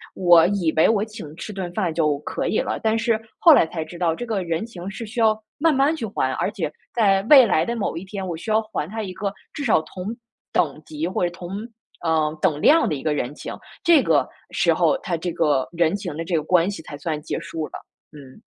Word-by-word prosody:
我 175 -3 +6
以 180 -5 0
为 160 - +5
我 215 -2 +2
请 210 -9 -10
吃 210 - -7
顿 185 -3 -5
饭 175 -2 -1
就 155 -3 +1
可 - - -4
以 - - +1
了， - - -2
但 220 0 +2
是 230 -1 +2 0.2
后 330 - +8
来 280 - +5
才 160 -1 -4
知 170 +2 -10
道 170 -2 +1
这 240 - -5
个 215 -5 -2
人 170 +3 -2
情 195 -5 -8
是 230 +4 -6
需 230 +2 -3
要 220 -1 +3 0.2
慢 325 +1 +4
慢 275 +4 +3
去 275 - -4
还， 130 -9 -1
而 195 - -1
且 190 -8 -3 0.2
在 195 -4 +3
未 270 -4 +9
来 180 -7 +2
的 235 - -2
某 220 - -2
一 165 - -5
天， 195 0 -6
我 175 - -3
需 195 +7 -5
要 220 +1 +4
还 215 -7 -4
他 220 +2 -4
一 190 -3 -5
个 200 +1 -3 0.2
至 295 - -5
少 225 - +3
同 180 +2 -8 0.5
等 150 -2 0
级 155 +1 -4
或 185 - -1
者 175 - +1
同 175 0 -9 0.5
呃， 160 -2 +1
等 155 -5 +1
量 320 +2 +5
的 150 - -1
一 135 - -6
个 155 - +1
人 140 -2 -2
情， - - -7 0.3
这 325 -6 +5
个 - - +2 0.2
时 - - +2
候， 275 - +2
他 185 -9 -3
这 170 +2 -3
个 145 -5 +1
人 170 +1 +1
情 190 -7 -5
的 165 - -4
这 175 - -1
个 155 - +1
关 175 +2 +3
系 200 - -6
才 145 -2 -8
算 150 +1 -3
结 - - -4
束 160 -1 -5
了。 - - -22 0.4
嗯。 140 +4 -14
180 Hz, 265 characters per minute, -22 LUFS, 160-220 Hz, 0.5 s, 未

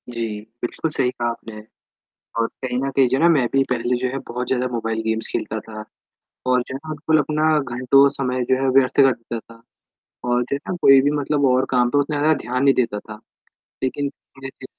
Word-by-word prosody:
जी, 115 -1 -4 0.4
बिल्कुल 155 +6 -3
सही 125 -4 +1
कहा 120 -1 -2
आपने 115 -2 -8 0.8
और 115 - +2 0.2
कहीं 125 -1 -2
न 135 +1 -1
कहीं 135 -2 +5
जो 130 - +1
है - - -1
ना 170 - +6
मैं 140 -7 +3
भी 135 0 +4
पहले 125 0 0
जो 130 +1 -1
है 135 - -4
बहुत 125 +1 -4
ज़्यादा 125 -1 0
मोबाइल 115 -1 -2
गेम्स 110 0 -2
खेलता 110 - -3
था 110 0 -9 0.6
और 125 0 +3
जो - - -7
है - - -2
ना 155 +3 -12
बिल्कुल 155 +1 +1
अपना 155 +1 +1 0.3
घंटों 135 +3 +5
समय 130 -2 -2
जो 130 - +5
है 135 - +2
व्यर्थ 135 +1 +3
कर 135 -1 +6
देता 115 -1 -6
था 115 - -19 0.7
और 120 0 +2
जो 125 - -3
है - - -4
ना - - -2
कोई 135 0 +7
भी 145 +2 +1
मतलब 145 0 0
और 130 0 +3
काम 125 -2 +2
पे 145 - +1
उतना 145 +1 0
ज़्यादा 155 +2 +3
ध्यान 125 +2 -1
नहीं 140 -1 +5
देता 115 -5 0
था, 105 0 -11 0.6
लेकिन 140 +2 -1 0.3
जैसे 135 0 -9
130 Hz, 225 wpm, -21 LUFS, 120-140 Hz, 0.8 s, कोई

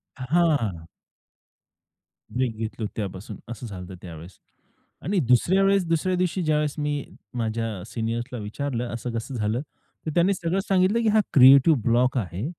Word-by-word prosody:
हां. 130 - +1 1.5
ब्रेक 125 -3 -1
घेतलो 110 0 -4
त्यापासून 100 -2 -5
असं 120 +1 -7
झालं 95 -3 -7
होतं 95 0 -9
त्यावेळेस. 85 +1 -11 0.6
आणि 190 +1 0
दुसऱ्या 180 +10 +4
वेळेस 195 -2 +3
दुसऱ्या 165 +3 +1
दिवशी 180 +1 0
ज्यावेळेस 150 -1 +1
मी 145 -1 -1 0.3
माझ्या 110 -4 -2
सीनियर्सला 115 +1 -3
विचारलं 120 +2 -4
असं 120 +1 -4
कसं 115 +3 -4
झालं, 110 +3 -1 0.4
तर 155 - -2
त्यांनी 180 +3 +4
सगळं 175 +1 -1
सांगितलं, 195 +4 +3
की 225 - +1
हा 215 +1 +4
क्रिएटिव्ह 135 +2 +7
ब्लॉक 125 +3 +2
आहे 95 - -3
125 Hz, 145 wpm, -25 LUFS, 110-165 Hz, 1.5 s, क्रिएटिव्ह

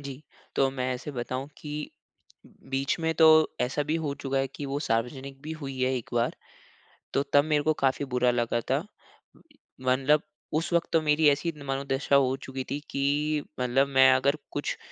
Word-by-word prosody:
जी। 140 0 -8 0.3
तो 135 -1 +3
मैं 130 -1 -2
ऐसे 135 +4 -6
बताऊँ 130 +1 -4
कि, 150 0 -5 0.6
बीच 135 +1 -3
में 160 0 +1
तो 160 - +6 0.3
ऐसा 130 +4 0
भी 150 +2 -1
हो 150 -3 -2
चुका 135 -1 -2
है 135 - +1
कि 145 - -6
वो 140 +1 -2
सार्वजनिक 135 +2 -2
भी 155 +1 -5
हुई 135 -4 -6
है 130 +1 +2
एक 120 - -7
बार। 120 0 +1 0.8
तो 140 - +2
तब 145 0 +7
मेरे 150 -2 +1
को 155 +1 +3
काफ़ी 135 +1 +1
बुरा 125 0 +3
लगा 120 -1 0
था। 145 +8 +1 1.0
मतलब 130 +4 +3 0.3
उस 160 +3 0
वक़्त 170 - +2
तो 165 - +4
मेरी 150 0 +3
ऐसी 145 +4 0
मनोदशा 135 0 0
हो 135 -1 +4
चुकी 135 0 -5
थी 145 - -1
कि 145 +2 0 0.2
मतलब 125 +2 +2
मैं 130 -1 +6
अगर 140 +3 +2
कुछ - - -3
135 Hz, 180 wpm, -27 LUFS, 130-150 Hz, 1.0 s, तब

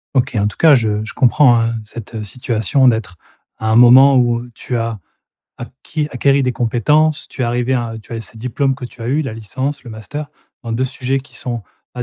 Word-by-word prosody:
OK, 125 -2 +1
en 105 0 +1
tout - - -6
cas, 160 -3 +6
je 110 -3 0
je - - -8
comprends 125 -2 +4
hein, 115 0 0
cette 110 0 -8
situation 120 +4 0
d'être, 110 -5 0 0.4
à 110 - -2
un - - +3
moment 130 +3 +7
où, 120 -1 +2
heu, 120 0 -11
tu 125 - -5
as 115 -2 -2 0.6
acquis 150 +5 -5
acquéris 140 +2 +2
des 125 -1 0
compétences, 145 +7 +1
tu 130 - -5
es - - +2
arrivée 120 +2 0
à 115 -2 -2
tu - - -22
as 115 - -4
ces 110 - -9
diplômes 130 +3 -1
que 125 -2 -7
tu 120 - -13
as 115 - -4
eu, 145 +4 +1
la 115 -6 -5
licence, 130 +5 -4
le 120 - -9
master, 145 +7 -7 0.3
dans 115 -2 -5
2 130 +3 0
sujets 130 +1 -2
qui 135 - -18
sont 120 -3 -4 0.3
pas 125 - -5
120 Hz, 220 wpm, -17 LUFS, 115-135 Hz, 0.6 s, moment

